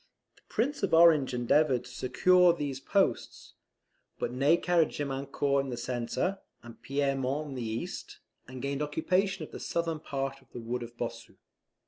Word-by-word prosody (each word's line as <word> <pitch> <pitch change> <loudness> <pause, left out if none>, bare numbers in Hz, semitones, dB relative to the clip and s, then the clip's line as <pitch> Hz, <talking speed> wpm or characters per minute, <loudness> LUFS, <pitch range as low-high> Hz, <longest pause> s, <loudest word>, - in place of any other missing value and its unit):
The - - -25
Prince 275 +6 -1
of 185 -5 +2
Orange 165 -5 +6
endeavoured 125 +1 +2
to 125 - -11
secure 180 +8 +4
these 145 -5 -4
posts; 195 +7 -1 0.6
but - - -2
Ney 140 +6 +3
carried 170 -3 +2
Gemiancourt 140 0 -1
in 135 - -6
the 120 - -4
centre, 125 +10 -2 0.2
and 120 -1 -13
Pierremont 140 +1 -1
on - - -6
the 130 - -5
east, 110 0 -5 0.3
and 130 0 -8
gained 140 +1 -2
occupation 180 +4 0
of - - -17
the - - -8
southern 165 -2 -2
part 135 -2 -4
of - - -27
the - - -6
wood 120 +2 -3
of 120 0 -9
Bossu. 115 -1 -6
140 Hz, 165 wpm, -29 LUFS, 125-165 Hz, 0.6 s, Orange